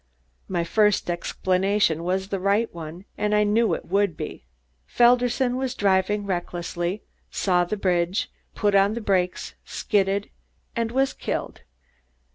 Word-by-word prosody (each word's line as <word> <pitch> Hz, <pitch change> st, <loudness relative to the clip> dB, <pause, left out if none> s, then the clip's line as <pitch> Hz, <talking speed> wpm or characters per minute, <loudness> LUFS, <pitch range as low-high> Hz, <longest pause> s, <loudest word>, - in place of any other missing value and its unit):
My 175 Hz, -2 st, -1 dB
first 210 Hz, 0 st, +2 dB
explanation 185 Hz, 0 st, 0 dB
was 190 Hz, +2 st, -1 dB
the 195 Hz, -, -2 dB
right 200 Hz, +4 st, +1 dB
one, 170 Hz, +2 st, -8 dB
as 210 Hz, 0 st, +1 dB
I 210 Hz, 0 st, +4 dB
knew 215 Hz, +2 st, +2 dB
it -, -, -8 dB
would 195 Hz, -3 st, +1 dB
be. -, -, -7 dB, 0.4 s
Felderson 245 Hz, +1 st, +3 dB
was 260 Hz, -1 st, -2 dB
driving 200 Hz, 0 st, +1 dB
recklessly, 175 Hz, 0 st, -3 dB, 0.3 s
saw 180 Hz, -2 st, +1 dB
the 210 Hz, +5 st, -3 dB
bridge, 180 Hz, 0 st, 0 dB, 0.2 s
put 205 Hz, -2 st, +1 dB
on 200 Hz, +2 st, +4 dB
the -, -, -2 dB
brakes, 185 Hz, -3 st, 0 dB
skidded 200 Hz, -1 st, 0 dB, 0.4 s
was 240 Hz, +4 st, 0 dB
killed." -, -, -4 dB
200 Hz, 130 wpm, -24 LUFS, 180-210 Hz, 0.4 s, I